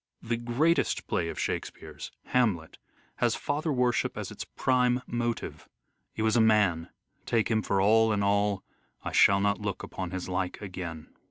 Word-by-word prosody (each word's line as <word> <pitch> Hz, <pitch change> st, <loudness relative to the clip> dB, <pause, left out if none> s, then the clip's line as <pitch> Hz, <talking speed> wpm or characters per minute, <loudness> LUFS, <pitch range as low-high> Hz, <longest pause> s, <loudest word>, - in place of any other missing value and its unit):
The 115 Hz, +1 st, -1 dB
greatest 120 Hz, +8 st, +1 dB
play 85 Hz, -, -1 dB
of -, -, -6 dB
Shakespeare's, -, -, -5 dB
" -, -, -51 dB
Hamlet," 105 Hz, -11 st, +1 dB, 0.4 s
has -, -, +2 dB
father 150 Hz, +2 st, -2 dB
worship 125 Hz, -3 st, +1 dB
as -, -, -5 dB
its -, -, -6 dB
prime 125 Hz, -1 st, +1 dB
motive: 120 Hz, -1 st, -3 dB, 0.2 s
" -, -, -49 dB
He 110 Hz, -, -2 dB
was 110 Hz, -1 st, +2 dB
a 120 Hz, -, +5 dB
man, 105 Hz, -7 st, +3 dB, 0.4 s
take 115 Hz, -1 st, +1 dB
him 110 Hz, -1 st, +2 dB
for 100 Hz, -2 st, 0 dB
all 110 Hz, +3 st, +4 dB
in 100 Hz, -1 st, +1 dB
all, 100 Hz, 0 st, +1 dB, 0.4 s
I -, -, -4 dB
shall 100 Hz, 0 st, +5 dB
not 100 Hz, +1 st, +1 dB
look 100 Hz, -2 st, -3 dB
upon 95 Hz, -2 st, -5 dB
his 95 Hz, 0 st, -5 dB
like 90 Hz, 0 st, -2 dB
again." 90 Hz, -5 st, -7 dB
105 Hz, 175 wpm, -28 LUFS, 95-120 Hz, 0.4 s, a